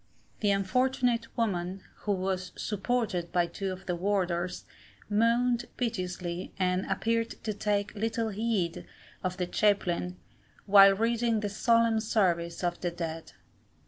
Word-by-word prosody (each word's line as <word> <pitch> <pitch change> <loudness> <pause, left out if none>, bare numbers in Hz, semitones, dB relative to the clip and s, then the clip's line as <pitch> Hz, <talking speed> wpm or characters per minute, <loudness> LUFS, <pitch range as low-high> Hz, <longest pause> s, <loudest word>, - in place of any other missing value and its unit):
The 210 - +2
unfortunate 240 +4 +1
woman, 190 -4 -1 0.2
who 205 - +3
was 185 -1 -2
supported 210 -4 -1
by 175 -1 +3
two 190 +2 -4
of 185 +1 -8
the 180 - -1
warders, 180 -1 -1 0.5
moaned 235 +3 +2
piteously, 180 -6 -3
and 185 0 0
appeared 230 0 0
to 215 - -1
take 205 0 -1
little 225 +1 -1
heed 205 -5 -1 0.4
of 185 -1 -2
the 180 - 0
chaplain, 180 -2 +1 0.5
while 195 -1 +8
reading 230 +1 +1
the 205 - -1
solemn 230 +1 +3
service 175 -6 0
of 175 0 -1
the 175 - 0
dead. 165 -2 -6
200 Hz, 130 wpm, -29 LUFS, 180-225 Hz, 0.5 s, while